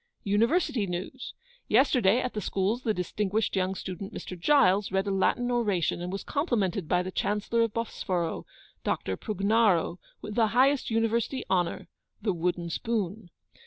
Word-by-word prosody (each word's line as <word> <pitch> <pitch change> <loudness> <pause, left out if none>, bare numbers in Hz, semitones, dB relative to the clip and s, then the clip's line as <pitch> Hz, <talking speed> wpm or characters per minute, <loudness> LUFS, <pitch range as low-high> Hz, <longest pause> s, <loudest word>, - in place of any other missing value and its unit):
'UNIVERSITY 225 - +2
NEWS. 185 +9 -5 0.3
Yesterday, 240 -3 +4
at 250 - -3
the 210 - -3
Schools, 200 +6 -1
the 225 - 0
distinguished 205 +3 -1
young 190 0 0
student, 190 +1 -6
Mr. 185 - -7
Giles, 195 - +3
read 190 +1 +1
a 200 - -1
Latin 245 +6 +1
oration, 205 -9 0
and 180 +1 -4
was 195 - -4
complimented 210 - -1
by 180 +2 +2
the 185 - -5
Chancellor 210 +4 0
of 230 -2 +1
Bosforo, 185 -7 -2 0.4
Dr. 95 - -1
Prugnaro, 200 - +1 0.2
with 210 - -7
the 225 0 +3
highest 275 +2 +4
University 230 +3 0
honour 175 -2 0 0.3
the 205 -2 0
wooden 175 0 -2
spoon. 210 -2 -2
205 Hz, 150 wpm, -28 LUFS, 185-230 Hz, 0.4 s, Yesterday